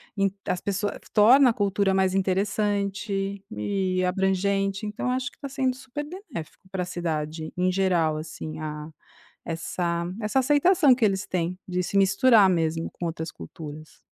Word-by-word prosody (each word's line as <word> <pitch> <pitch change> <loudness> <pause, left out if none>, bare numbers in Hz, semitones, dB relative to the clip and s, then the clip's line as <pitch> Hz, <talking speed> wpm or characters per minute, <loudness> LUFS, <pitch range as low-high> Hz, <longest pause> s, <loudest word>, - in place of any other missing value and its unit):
ent 195 -2 +1
as 180 - -1
pessoas, 205 +1 -1
eh, - - -10
f - - -20
torna 250 +5 +7
a - - +2
cultura 200 -2 +1
mais 190 -1 +2
interessante 200 0 -1
e 190 -4 -1
abrangente, 195 +2 0
então, 210 +4 -2
acho 255 +2 -1
que - - -26
tá 280 - -5
sendo 260 -2 0
super 265 +3 -6
benéfico 295 - -9
pra 185 -2 -2
cidade, 160 -3 -3
em 180 +1 +2
geral, 180 -4 +2
assim, 155 0 -6
a 150 -1 -5 0.6
essa 170 +1 -2 0.2
essa 210 +5 +1
aceitação 295 +3 +5
que 245 -2 +2
eles 195 -1 0
têm 180 -1 -2
de 180 -1 -1
se 190 +2 -1
misturar 200 +2 +5
mesmo 165 -2 0
com 175 - -6
outras 160 -1 -4
culturas. 150 - -10
195 Hz, 160 wpm, -25 LUFS, 175-210 Hz, 0.6 s, torna